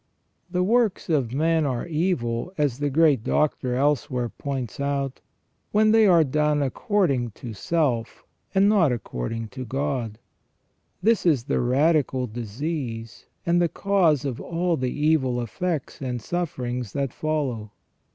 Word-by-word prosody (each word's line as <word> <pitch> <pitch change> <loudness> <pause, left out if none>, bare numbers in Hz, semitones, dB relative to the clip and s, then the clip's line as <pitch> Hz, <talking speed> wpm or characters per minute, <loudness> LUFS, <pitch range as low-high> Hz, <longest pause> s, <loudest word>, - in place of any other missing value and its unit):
The 180 0 0
works 225 -2 +1
of 135 -7 +1
men 160 +4 +2
are 130 -4 -1
evil, 155 -6 -1
as 145 -4 0
the 145 0 0
great 145 -4 +3
Doctor 130 -4 0
elsewhere 130 -3 0
points 135 -4 -5
out, 140 -1 -2 0.5
when 215 +1 +4
they 220 -1 +6
are 170 -4 +6
done 150 +1 +1
according 135 - 0
to 115 +1 -8
self, 120 -1 -1 0.3
and 195 +1 +5
not 195 -9 +4
according 115 - -4
to 130 +2 -7
God. 130 -4 -2 0.9
This 225 +2 +3
is 150 -9 +3
the - - 0
radical 135 0 +2
disease, 115 +1 -5 0.2
and 175 +1 +3
the 170 - +2
cause 170 -6 +2
of 130 -4 -3
all 175 0 0
the 130 -4 -1
evil 145 -5 +1
effects 150 +7 -3
and 125 -2 -3
sufferings 125 - -3
that 140 -3 -2
follow. 140 -9 -2
140 Hz, 140 wpm, -24 LUFS, 125-165 Hz, 0.9 s, they